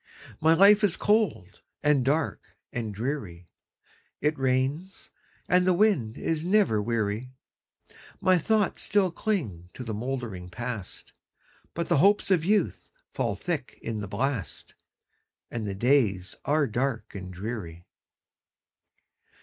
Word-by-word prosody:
My 160 Hz, +1 st, +5 dB
life 200 Hz, +4 st, +6 dB
is 200 Hz, -5 st, +2 dB
cold, 205 Hz, -, 0 dB, 0.2 s
and 145 Hz, -3 st, +3 dB
dark, 145 Hz, +4 st, -1 dB, 0.2 s
and 115 Hz, -3 st, -3 dB
dreary; 100 Hz, -, -5 dB, 0.7 s
It 150 Hz, +1 st, +1 dB
rains, 135 Hz, +7 st, -1 dB, 0.4 s
and 180 Hz, 0 st, +3 dB
the 185 Hz, -, +4 dB
wind 170 Hz, -, +2 dB
is 160 Hz, -1 st, -1 dB
never 185 Hz, -, +3 dB
weary; 110 Hz, +1 st, -1 dB, 0.9 s
My 185 Hz, -1 st, +4 dB
thoughts 210 Hz, +2 st, +1 dB
still 200 Hz, -3 st, +2 dB
cling 130 Hz, -, -3 dB
to 125 Hz, -, -6 dB
the 115 Hz, -2 st, -4 dB
mouldering 110 Hz, -6 st, -4 dB
Past, 115 Hz, -1 st, -6 dB, 0.6 s
But 170 Hz, 0 st, -2 dB
the 170 Hz, -, +3 dB
hopes 200 Hz, +5 st, +4 dB
of 175 Hz, -4 st, +4 dB
youth 205 Hz, +4 st, 0 dB, 0.2 s
fall -, -, -1 dB
thick 160 Hz, -7 st, -4 dB
in 110 Hz, -2 st, -3 dB
the 100 Hz, -, -5 dB
blast, 125 Hz, -1 st, -3 dB, 0.8 s
And 115 Hz, -3 st, -3 dB
the 100 Hz, -, -3 dB
days 105 Hz, -6 st, +2 dB
are 150 Hz, 0 st, +3 dB
dark 125 Hz, 0 st, -2 dB
and 95 Hz, -2 st, -7 dB
dreary. 90 Hz, -4 st, -6 dB
130 Hz, 125 wpm, -27 LUFS, 105-175 Hz, 0.9 s, life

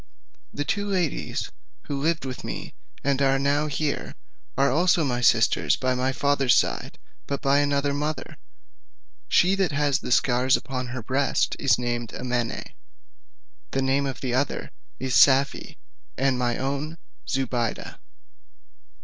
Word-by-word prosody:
The 145 Hz, -, -3 dB
two 205 Hz, +7 st, -1 dB
ladies 180 Hz, -7 st, -2 dB, 0.3 s
who 140 Hz, -1 st, -4 dB
live 160 Hz, -1 st, 0 dB
with 130 Hz, -1 st, -6 dB
me, -, -, -6 dB, 0.3 s
and 140 Hz, 0 st, +1 dB
are 135 Hz, 0 st, +3 dB
now 140 Hz, +2 st, +1 dB
here, 150 Hz, 0 st, -2 dB, 0.4 s
are 140 Hz, 0 st, +3 dB
also 170 Hz, +3 st, +3 dB
my 125 Hz, -4 st, -1 dB
sisters 115 Hz, -2 st, +3 dB
by 130 Hz, 0 st, 0 dB
the 130 Hz, +1 st, 0 dB
father's 140 Hz, -1 st, +2 dB
side, -, -, 0 dB, 0.3 s
but 140 Hz, -, -2 dB
by 140 Hz, 0 st, +3 dB
another 140 Hz, 0 st, +1 dB
mother: 150 Hz, +2 st, -3 dB, 0.9 s
she 180 Hz, +2 st, +4 dB
that 195 Hz, -4 st, +1 dB
has 145 Hz, -1 st, +1 dB
the -, -, -6 dB
scars 125 Hz, +1 st, +3 dB
upon 130 Hz, -2 st, -5 dB
her 125 Hz, -1 st, -6 dB
breast 135 Hz, +4 st, 0 dB
is 135 Hz, -4 st, +3 dB
named 120 Hz, -2 st, -3 dB
Amene; 125 Hz, -2 st, -3 dB, 1.0 s
the 135 Hz, -, -1 dB
name 135 Hz, +1 st, +1 dB
of 135 Hz, -, -5 dB
the 125 Hz, -2 st, -2 dB
other 130 Hz, +3 st, -1 dB, 0.3 s
is 130 Hz, -1 st, -3 dB
Safie, 135 Hz, +1 st, +4 dB, 0.4 s
and 135 Hz, 0 st, +2 dB
my 120 Hz, -1 st, 0 dB
own 140 Hz, +4 st, -3 dB, 0.3 s
Zobeide. 125 Hz, -4 st, -2 dB
135 Hz, 140 wpm, -25 LUFS, 130-145 Hz, 1.0 s, she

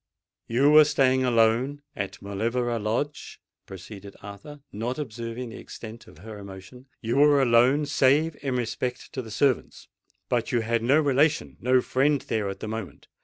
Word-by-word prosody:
"You 135 Hz, +5 st, +3 dB
were 155 Hz, 0 st, +9 dB
staying 135 Hz, -3 st, +2 dB
alone 120 Hz, +4 st, +2 dB
at 100 Hz, -, -5 dB
Mauleverer 115 Hz, +4 st, -1 dB
Lodge," 115 Hz, +8 st, -3 dB, 0.3 s
proceeded 100 Hz, +1 st, -10 dB
Arthur, 100 Hz, +9 st, -10 dB
not 115 Hz, +6 st, -4 dB
observing 115 Hz, -2 st, -6 dB
the 115 Hz, -, -9 dB
extent 115 Hz, +1 st, -10 dB
of 75 Hz, -, -16 dB
her 105 Hz, +4 st, -10 dB
emotion; 100 Hz, +6 st, -12 dB
"you 115 Hz, +3 st, -1 dB
were 145 Hz, 0 st, +5 dB
alone, 130 Hz, +3 st, +4 dB
save 150 Hz, +2 st, +2 dB
in 135 Hz, -3 st, -2 dB
respect 125 Hz, +1 st, -4 dB
to 130 Hz, -, -3 dB
the 115 Hz, -, -11 dB
servants: 125 Hz, +4 st, -1 dB, 0.4 s
but -, -, -1 dB
you 120 Hz, -, +1 dB
had 115 Hz, +1 st, 0 dB
no 135 Hz, +6 st, +3 dB
relation—no 140 Hz, -3 st, +2 dB
friend 140 Hz, +3 st, +1 dB
there 110 Hz, -3 st, -2 dB
at 100 Hz, -, -7 dB
the -, -, -5 dB
moment. 110 Hz, -8 st, -7 dB
120 Hz, 160 wpm, -25 LUFS, 110-140 Hz, 0.4 s, were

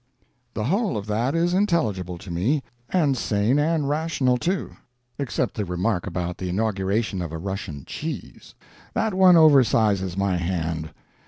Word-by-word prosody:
The 105 Hz, -, -2 dB
whole 195 Hz, -, 0 dB
of 100 Hz, -, -4 dB
that 115 Hz, +7 st, 0 dB
is 170 Hz, +1 st, +2 dB
intelligible 110 Hz, -, 0 dB
to 85 Hz, -, -9 dB
me 120 Hz, -, 0 dB, 0.3 s
and 155 Hz, -7 st, +2 dB
sane 115 Hz, +3 st, +1 dB
and 155 Hz, -1 st, +1 dB
rational, 145 Hz, -4 st, +1 dB
too 180 Hz, +7 st, -2 dB, 0.4 s
except 140 Hz, -5 st, -1 dB
the 105 Hz, -, -2 dB
remark 90 Hz, +1 st, -1 dB
about 90 Hz, -1 st, -3 dB
the 90 Hz, -, -3 dB
Inauguration 100 Hz, 0 st, -1 dB
of 85 Hz, -3 st, -4 dB
a 80 Hz, -, -4 dB
Russian 90 Hz, -5 st, -5 dB
Cheese. 160 Hz, +1 st, -7 dB, 0.4 s
That 220 Hz, -2 st, 0 dB
one 185 Hz, -1 st, +6 dB
oversizes 110 Hz, -, +4 dB
my 100 Hz, -2 st, +1 dB
hand. 85 Hz, -3 st, -2 dB
110 Hz, 150 wpm, -24 LUFS, 90-155 Hz, 0.4 s, one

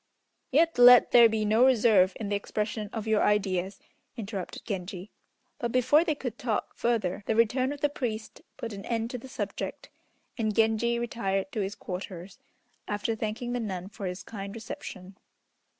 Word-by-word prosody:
"Yet 325 Hz, +1 st, +3 dB
let 245 Hz, 0 st, +8 dB
there 235 Hz, -1 st, +8 dB
be 215 Hz, -1 st, -1 dB
no 220 Hz, +3 st, +4 dB
reserve 220 Hz, -7 st, +5 dB
in 210 Hz, -3 st, -4 dB
the 205 Hz, -, 0 dB
expression 210 Hz, +1 st, -3 dB
of 220 Hz, -2 st, -4 dB
your 220 Hz, -1 st, +2 dB
ideas," 195 Hz, -2 st, 0 dB, 0.4 s
interrupted 200 Hz, -4 st, -6 dB
Genji; 190 Hz, -1 st, -5 dB, 0.5 s
but, 235 Hz, -1 st, -2 dB
before 255 Hz, +6 st, +4 dB
they 315 Hz, -3 st, 0 dB
could 250 Hz, -4 st, -6 dB
talk 235 Hz, -6 st, -2 dB
further, 215 Hz, -6 st, 0 dB
the 220 Hz, -, +1 dB
return 250 Hz, +4 st, +2 dB
of 290 Hz, 0 st, -7 dB
the 295 Hz, -, +4 dB
priest 225 Hz, -6 st, -5 dB, 0.2 s
put 230 Hz, -2 st, -5 dB
an 200 Hz, 0 st, -7 dB
end 230 Hz, 0 st, -2 dB
to 250 Hz, -, -4 dB
the 265 Hz, -, -11 dB
subject, -, -, -5 dB, 0.5 s
and 215 Hz, -2 st, 0 dB
Genji 225 Hz, +1 st, +2 dB
retired 225 Hz, -2 st, -2 dB
to 235 Hz, -, -3 dB
his 200 Hz, 0 st, -2 dB
quarters, 180 Hz, -1 st, -7 dB, 0.5 s
after 210 Hz, +2 st, -1 dB
thanking 220 Hz, +3 st, -3 dB
the 245 Hz, -, -1 dB
nun 190 Hz, -4 st, -4 dB
for 200 Hz, -2 st, -6 dB
his 180 Hz, 0 st, -5 dB
kind 200 Hz, -1 st, -7 dB
reception. 190 Hz, -4 st, -8 dB
220 Hz, 170 wpm, -28 LUFS, 200-240 Hz, 0.5 s, let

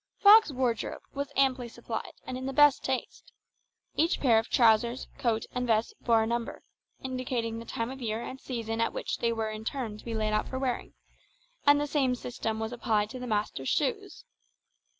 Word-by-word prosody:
Mr. -, -, -45 dB
Fogg's 425 Hz, -3 st, +8 dB
wardrobe 250 Hz, -4 st, -2 dB
was 280 Hz, 0 st, -4 dB
amply 260 Hz, -3 st, +2 dB
supplied 230 Hz, -1 st, -6 dB
and 255 Hz, -, -5 dB
in 260 Hz, +1 st, -4 dB
the 270 Hz, -, -3 dB
best 295 Hz, 0 st, +5 dB
taste. 265 Hz, -1 st, -4 dB, 0.6 s
Each 330 Hz, +3 st, +2 dB
pair 235 Hz, -5 st, +5 dB
of 225 Hz, -, -5 dB
trousers, 235 Hz, +1 st, +3 dB
coat, 225 Hz, -2 st, 0 dB
and 250 Hz, 0 st, -2 dB
vest 220 Hz, 0 st, +1 dB
bore 230 Hz, -2 st, +4 dB
a -, -, 0 dB
number, 235 Hz, 0 st, -3 dB, 0.4 s
indicating 250 Hz, -3 st, -2 dB
the 230 Hz, -, -9 dB
time 230 Hz, +1 st, -3 dB
of 265 Hz, 0 st, -9 dB
year 220 Hz, -2 st, -2 dB
and 260 Hz, +3 st, -7 dB
season 230 Hz, -3 st, -3 dB
at 230 Hz, -, +1 dB
which -, -, -3 dB
they 235 Hz, -, +1 dB
were 225 Hz, -1 st, -2 dB
in 215 Hz, 0 st, -6 dB
turn 225 Hz, -4 st, -4 dB
to -, -, -14 dB
be 230 Hz, -1 st, -4 dB
laid 215 Hz, -1 st, 0 dB
out 215 Hz, -, +1 dB
for 260 Hz, -, -4 dB
wearing; 260 Hz, -2 st, -3 dB, 0.7 s
and 290 Hz, 0 st, +7 dB
the 295 Hz, -, 0 dB
same 275 Hz, -4 st, +1 dB
system 225 Hz, -3 st, -4 dB
was 220 Hz, +1 st, -3 dB
applied 215 Hz, -3 st, 0 dB
to 255 Hz, -, -7 dB
the 250 Hz, -, -5 dB
master's 205 Hz, -, -1 dB
shoes. -, -, -1 dB
235 Hz, 200 wpm, -29 LUFS, 225-260 Hz, 0.7 s, Fogg's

